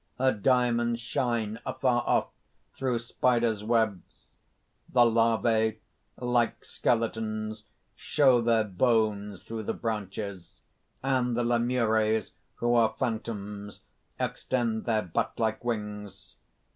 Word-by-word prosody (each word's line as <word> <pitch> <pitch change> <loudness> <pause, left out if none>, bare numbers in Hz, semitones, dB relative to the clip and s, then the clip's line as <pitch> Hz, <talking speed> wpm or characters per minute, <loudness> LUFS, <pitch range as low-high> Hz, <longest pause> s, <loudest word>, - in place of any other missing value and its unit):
Her 130 +1 +3
diamonds 120 0 +2
shine 115 -3 -1
afar 125 -2 +1
off - - +2 0.4
through 130 -3 -1
spiders' 120 -2 +1
webs. 110 -4 -1 0.6
The 125 - +3
Larvæ, 115 -1 +3 0.4
like 120 -1 0
skeletons, 110 -2 -1 0.3
show 130 -5 +3
their 115 -1 +3
bones 105 -1 0
through 115 -1 -5
the 105 - -3
branches; 100 -4 -5 0.4
and 125 -3 +1
the 120 - +1
Lemures, 115 -2 +1 0.2
who 120 0 +1
are 115 -2 +3
phantoms, 105 -3 -4 0.4
extend 115 -4 -1
their 110 -2 +1
bat 85 - -1
like 110 0 -1
wings. 105 -4 -5
115 Hz, 105 wpm, -28 LUFS, 110-120 Hz, 0.6 s, Her